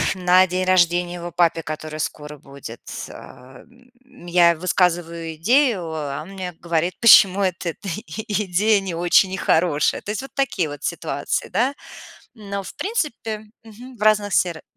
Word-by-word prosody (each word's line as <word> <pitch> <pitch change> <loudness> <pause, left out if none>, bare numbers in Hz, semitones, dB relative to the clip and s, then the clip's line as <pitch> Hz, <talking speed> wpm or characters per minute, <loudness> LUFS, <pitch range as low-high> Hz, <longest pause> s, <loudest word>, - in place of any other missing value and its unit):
на 185 0 +4
день 185 +1 -2
рождения 175 -1 +2
его 175 0 -7
папе, 170 -1 +1
который 155 0 -6
скоро 150 0 -5
будет, 140 -4 -11 0.3
э. 125 0 -14 0.6
Я 170 -1 +4
высказываю 170 -2 -1
идею, 235 - +2
а 145 -3 -4
он 180 - -13
мне 185 -2 -6
говорит, 170 +1 -1
почему 200 -4 +7
вот 185 -2 -2
эта 175 +4 -5 0.2
идея 210 -1 0
не 185 -3 -5
очень 180 +3 +3
хорошая. 160 -5 +1
То 210 - -5
есть 220 - -3
вот 270 - -10
такие 230 - 0
вот 145 0 -9
ситуации, 155 -4 -3
да. 245 +9 0 0.6
Но, 200 -3 -6
в - - -10
принципе 230 - -3 0.2
мгм. 240 +4 -13
В - - -10
разных 210 -1 +3
сфера 170 -3 0
180 Hz, 150 wpm, -21 LUFS, 165-205 Hz, 0.6 s, почему